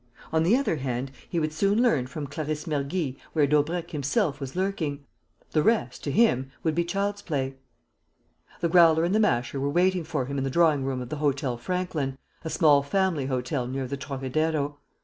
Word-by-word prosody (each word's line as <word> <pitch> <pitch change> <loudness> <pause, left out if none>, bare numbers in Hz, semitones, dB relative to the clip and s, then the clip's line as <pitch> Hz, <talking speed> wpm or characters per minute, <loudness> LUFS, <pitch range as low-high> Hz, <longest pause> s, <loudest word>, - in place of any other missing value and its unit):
On 160 - +3
the 180 +8 +4
other 275 - 0
hand, 130 -1 -3 0.2
he 170 - 0
would 155 -1 -1
soon 200 +6 +2
learn 155 - +3
from 150 +2 -5
Clarisse 150 +2 -4
Mergy 145 -1 -2 0.2
where 150 -3 +4
Daubrecq 160 +4 0
himself 150 - 0
was 135 0 -6
lurking. 165 -7 -2 0.5
The 155 - +3
rest, 215 - +1
to 145 - -1
him, 135 - +3
would 160 - +1
be 170 +2 +1
child's 200 +3 -2
play. 135 -6 -2 1.1
The 170 - +1
Growler 165 -2 +6
and 175 +3 +1
the 215 - +3
Masher 135 - +1
were 140 +1 0
waiting 180 +3 +2
for 155 -5 -2
him 140 +1 -3
in - - -1
the 135 - -1
drawing 155 -2 +3
room 130 -1 -2
of 120 - -10
the 155 - -4
Hôtel 140 -4 0
Franklin, 155 -3 -2 0.3
a 160 - -3
small 150 -4 +5
family 160 -2 0
hotel 130 0 -2
near 135 +1 -3
the 130 - -3
Trocadero. 145 +2 -2
150 Hz, 190 wpm, -26 LUFS, 135-170 Hz, 1.1 s, Growler